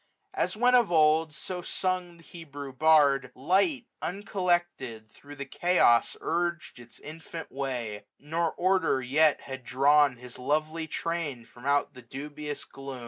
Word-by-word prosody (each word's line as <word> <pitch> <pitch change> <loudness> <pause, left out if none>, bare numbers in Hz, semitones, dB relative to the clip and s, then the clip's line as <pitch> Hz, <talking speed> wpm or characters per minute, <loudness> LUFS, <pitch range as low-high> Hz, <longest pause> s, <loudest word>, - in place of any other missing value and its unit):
As 390 - -1
when 245 +2 +4
of 240 -7 +4
old 160 0 +4
Cso 175 +4 -6
sung 185 -2 -2
the 165 - -18
Hebrew 145 -5 -9
Bard) 140 -3 +4
730 130 +3 -14
Light, 235 - +2
uncollected, 175 - -2
thro* 145 0 -13
the 140 -1 -6
chaos 175 -11 +3
urg*d 170 -6 -2
Its 120 -1 -14
infant 160 +1 -9
way; 125 -6 -4
nor 165 +3 -1
Order 185 -8 +1
yet 150 +4 +3
had 130 -1 -8
drawn 140 +1 +4
His 125 0 -11
lovely 155 +4 -1
train 155 -7 -3
from 125 +3 -11
out 140 0 +2
the 125 - -12
dubious 145 +4 -7
gloom. 135 -1 -8
150 Hz, 145 wpm, -28 LUFS, 135-170 Hz, -, when